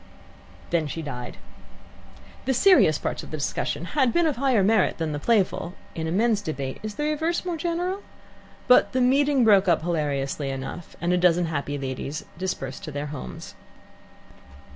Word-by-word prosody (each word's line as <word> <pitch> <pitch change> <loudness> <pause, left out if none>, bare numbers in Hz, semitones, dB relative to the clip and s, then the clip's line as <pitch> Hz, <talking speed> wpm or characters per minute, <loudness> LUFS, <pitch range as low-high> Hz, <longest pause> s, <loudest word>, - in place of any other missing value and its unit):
Then 165 -3 +1
she 165 +3 -5
died. 125 -4 -6 1.1
The 265 - +1
serious 295 - +5
parts - - -3
of - - -11
the 155 - -4
discussion 145 +2 -2
had 265 -5 +3
been 345 +4 +2
of 300 -5 0
higher 255 -6 +3
merit 215 0 +3
than 160 -2 -2
the 145 - -3
playful 190 -2 +1 0.2
in 160 0 -3
a - - -2
men's 215 +2 +2
debate 140 -6 -4
is 215 -1 -6
the 295 - -3
reverse 320 +4 -1
more 355 -2 -2
general? 350 +4 -2 0.7
but 250 - +5
the 260 - +1
meeting 270 +1 +3
broke 200 -3 +5
up 170 -3 +3
hilariously 145 -4 -1
enough, 135 +6 -6
and 175 +1 0
a 180 - +2
dozen 175 -1 +3
happy 145 -2 -3
ladies 135 +2 -5
dispersed 135 -8 -4
to 155 - -6
their 145 +1 -4
homes. 145 - -8
180 Hz, 170 wpm, -25 LUFS, -, 1.1 s, serious